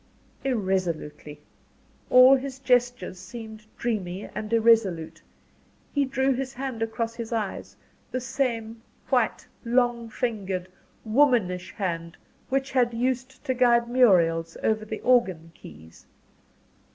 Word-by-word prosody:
Irresolutely 185 - -2 0.7
all 255 +2 +8
his 265 0 -4
gestures 245 -7 0
seemed 220 +2 -10
dreamy 200 -5 -3
and 210 +1 -5
irresolute 220 -8 +2 0.7
he 285 -1 +2
drew 265 0 +1
his 260 +1 -4
hand 260 -3 -5
across 225 0 -2
his 230 -1 -7
eyes 220 -4 -3 0.3
the 255 - -2
same 230 -3 -2 0.3
white - - +1 0.2
long 240 -1 +1
fingered, 200 -7 -3 0.4
womanish 220 -7 +2
hand 170 -4 -3 0.3
which 270 +1 -1
had 245 -3 +2
used 255 +2 -2
to 260 - 0
guide 240 -2 +3
Muriel's 170 -9 +3
over 215 0 +1
the 215 0 -6
organ 185 -10 +2
keys. 80 - -15
230 Hz, 115 wpm, -26 LUFS, 190-255 Hz, 0.7 s, all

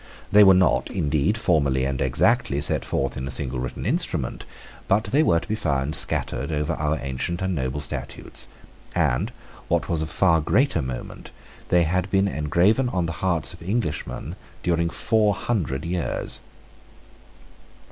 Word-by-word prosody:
They 105 +1 +8
were 95 -1 +8
not, 95 0 +3
indeed, 80 +3 0
formally 70 -11 +2
and 65 -1 -2
exactly 70 - +2
set - - +1
forth 70 -1 -1
in 65 +1 -4
a - - -4
single 65 -4 -2
written 65 +1 -5
instrument; 95 - -1 0.4
but 105 +3 +3
they 140 +6 +2
were 85 - +3
to - - -11
be 110 - -1
found 75 -8 -1
scattered 80 - -1
over 75 -1 -1
our 75 +1 -1
ancient 70 +6 -3
and 95 0 -1
noble 65 -2 -2
statutes; - - -6 0.5
and, - - +1 0.4
what - - 0
was 80 -2 +1
of 80 - -3
far 85 -3 +3
greater 130 - +2
moment, 65 -2 -6 0.4
they 90 -1 +4
had 90 +3 0
been 95 +1 +3
engraven 95 - +2
on 90 -6 -1
the 85 - -2
hearts 85 -5 0
of - - -14
Englishmen 95 -3 -3 0.3
during 85 -1 +1
four 105 +2 +2
hundred 80 - -2
years. 90 0 -2
85 Hz, 155 wpm, -24 LUFS, 70-95 Hz, 0.5 s, They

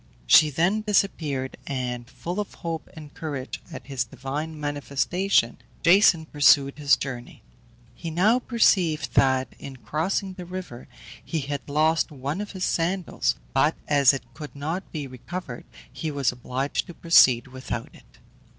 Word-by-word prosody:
She 150 - +7
then 175 +9 +1
disappeared, 160 -10 0
and, 125 -3 -4
full 175 +4 -5
of 205 - -4
hope 165 -2 -5
and 150 -2 -11
courage 140 -5 -5
at - - -8
this 135 -4 -1
divine 140 +6 -5
manifestation, 145 +1 0 0.2
Jason 170 -2 +5
pursued 140 -1 +4
his 145 -2 +4
journey. 125 - -7 0.5
He 165 - -6
now 200 +9 +3
perceived 190 -10 +2
that 130 -1 +3
in 135 - -8
crossing 185 +8 -2
the 180 -1 -8
river 180 -9 -8 0.4
he 160 -3 -3
had 140 0 -5
lost 155 +3 +2
one 145 +6 -4
of 210 - -7
his 185 -1 -2
sandals, 175 +1 0 0.2
but - - +3
as 140 -3 +5
it 135 - -4
could 150 -2 -9
not 160 +7 -4
be 150 -3 -4
recovered 130 +2 -7 0.3
he 160 - -4
was 140 -3 0
obliged 125 +3 -3
to 175 - -10
proceed 130 -8 +5
without 130 -2 -5
it. - - -20
150 Hz, 150 wpm, -25 LUFS, 135-175 Hz, 0.5 s, She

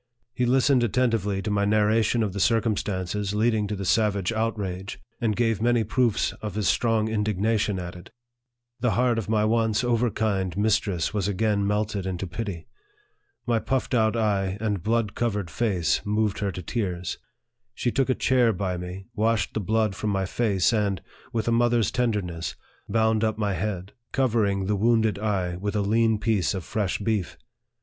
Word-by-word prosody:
He 125 0 0
listened 130 0 +4
attentively 110 -5 0
to 105 - -2
my 100 0 +1
narra 105 +2 +3
tion 115 +2 +1
of 100 -3 -2
the 100 - -4
circumstances 105 -3 0
leading 110 -1 +2
to 105 - -3
the 100 -1 -5
savage 100 -1 +2
outrage, 100 -4 -3 0.2
and 110 -3 0
gave 115 -2 +1
many 120 0 +3
proofs 115 +1 +1
of 105 -2 -5
his 105 -1 0
strong 115 -2 +2
indignation 105 -1 0
at 90 0 -6
it. 90 0 -12 0.7
The 120 -1 +1
heart 120 -2 +2
of 110 - -6
my 110 -1 +2
once 110 +1 +1
overkind 110 -6 0
mistress 105 -4 +1
was 100 -3 0
again 100 0 +1
melted 105 -2 -1
into 95 0 -3
pity. 90 -2 -5 0.8
My 115 -2 +2
puffed 130 +3 -2
out 110 -1 +2
eye 100 -3 0
and 105 -4 -1
blood 110 +1 0
covered 105 -7 -2
face 95 -9 +1
moved 105 0 0
her 100 -1 -1
to 90 +1 -7
tears. 90 -5 -3 0.6
She 120 - -1
took 135 +1 +1
a 130 - +3
chair 125 -3 +3
by 95 -2 -2
me, 90 +2 -7
washed 110 -2 0
the - - -1
blood 110 +1 +1
from 105 +2 -3
my 95 -1 0
face, 100 -1 +1
and, 100 -4 +1 0.3
with 115 -1 -2
a - - +2
mother's 120 -2 +2
tenderness, 100 -9 -1 0.3
bound 110 -1 +2
up 110 -1 0
my 105 -2 0
head, 95 0 -3 0.2
covering 110 -7 +1
the 105 +2 +1
wounded 110 0 +2
eye 95 -5 -1
with 100 +3 -3
a 105 - +2
lean 110 +2 +2
piece 105 -4 0
of 95 - -4
fresh 100 -1 -1
beef. 105 -4 -2
105 Hz, 175 wpm, -25 LUFS, 95-115 Hz, 0.8 s, listened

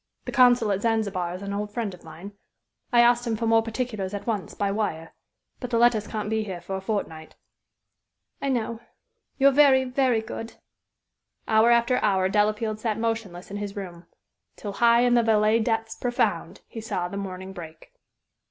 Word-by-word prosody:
The - - -4
consul 245 -4 +4
at 195 0 -1
Zanzibar 200 -6 -1
is 185 - -8
an 200 0 -4
old 205 +1 -3
friend 215 -3 -3
of 180 - -14
mine. 165 +5 -10 0.6
I 240 -1 +6
asked 240 0 +3
him 225 - 0
for 230 +2 -3
more 225 0 +4
particulars 220 -4 -4
at 200 - -6
once, 210 -7 -3
by 200 -1 -1
wire. 180 -6 -3 0.5
But 250 - -5
the 235 - 0
letters 230 -3 +3
can't 215 -2 -4
be 220 0 0
here 190 -4 -6
for 190 +3 -6
a 190 - -4
fortnight." 175 -6 -4 1.1
"I 275 - -1
know. 230 -3 -2 0.6
You're 275 0 +5
very, 270 -2 +5
very 250 -3 +1
good." 225 +1 -7 0.9
Hour 220 +1 +4
after 240 +1 +3
hour 190 -3 +1
Delafield 215 +2 0
sat 215 -1 -2
motionless 225 -6 -3
in 205 - -4
his 205 -1 -5
room, 180 -4 -8 0.5
till 205 -2 -6
"high 235 +2 +4
in 245 0 +3
the 240 - +5
Valais 220 0 +3
depths 225 0 -1
profound" 245 -1 -1
he 225 - -8
"saw 180 -5 -3
the 180 - -8
morning 190 -1 -6
break." 160 -3 -11
215 Hz, 180 wpm, -25 LUFS, 195-235 Hz, 1.1 s, I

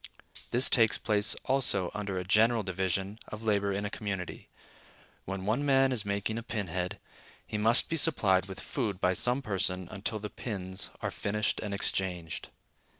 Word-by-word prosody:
This 125 +3 +5
takes 115 -3 +4
place 105 -1 +2
also 120 -9 +2
under 100 -2 -3
any 90 - -3
general 110 +4 +4
division 95 +2 -2
of 110 +1 -8
labor 100 -2 +1
in 100 +1 -2
a - - -2
community. 100 -4 -5 0.8
When 95 0 -4
one 110 +7 +1
man 135 -1 +4
is 115 -5 -1
making 100 +2 -1
a - - -6
pin 110 -3 -3
head, 90 +4 -3 0.5
he 105 - -3
must 115 +4 +6
be 165 - -1
supplied 95 - +3
with 95 -1 -8
food 105 -9 -3
by 90 -1 +2
some 125 +8 +1
person 95 -4 -2
until 105 +2 -2
the 105 0 -6
pins 95 -4 -3
are - - -1
finished 105 +1 -1
and 105 - -4
exchanged. 90 -4 -2
105 Hz, 170 wpm, -30 LUFS, 95-115 Hz, 0.8 s, must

